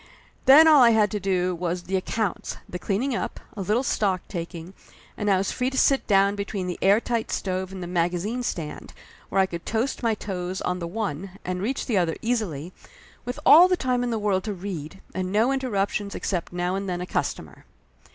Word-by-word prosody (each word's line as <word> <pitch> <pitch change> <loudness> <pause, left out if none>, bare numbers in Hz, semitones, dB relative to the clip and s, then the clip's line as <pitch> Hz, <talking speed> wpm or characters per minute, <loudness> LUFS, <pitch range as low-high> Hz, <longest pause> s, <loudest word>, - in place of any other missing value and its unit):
And - - -26
then 300 +4 +9
all 300 -3 +7
I 240 - +8
had 210 -3 +3
to 210 - -2
do 185 -2 0
was 175 0 -3
the 190 - -3
accounts, 195 +1 -2
the 180 - -6
cleaning 230 +9 -1
up, - - -3 0.2
a 205 - -4
little 215 +7 +1
stock 195 -7 0
taking, 170 0 -6 0.4
and 210 -1 -1
I 195 - +4
was 190 +1 -1
free 255 0 -1
to 265 - -5
sit 275 0 +3
down 200 -1 +4
between 200 -1 -3
the 180 -1 -4
airtight 220 +3 +2
stove 185 -1 -2
and 190 -1 -6
the - - -4
magazine 180 +7 -1
stand, 165 -10 -5 0.4
where 195 - +1
I 190 - +5
could 170 -2 -7
toast 230 +5 -1
my 230 -2 +1
toes 185 -2 -4
on 180 0 -1
the 170 - -4
one 195 -1 -4
and 180 0 -3
reach 255 +7 -2
the 215 -6 +1
other 165 -2 0
easily, 185 - -2 0.5
with 250 +4 -4
all 340 +4 +9
the 365 -1 +1
time 250 -3 0
in 245 - -1
the 230 - -1
world 205 -3 0
to 210 -2 -3
read, 185 -2 -6
and 185 0 -3
no 220 +6 +3
interruptions 205 -6 -1
except 180 -4 -3
now 175 +1 -1
and 195 0 -3
then 175 -1 -2
a - - -3
customer. - - -4
195 Hz, 210 wpm, -25 LUFS, 180-225 Hz, 0.5 s, then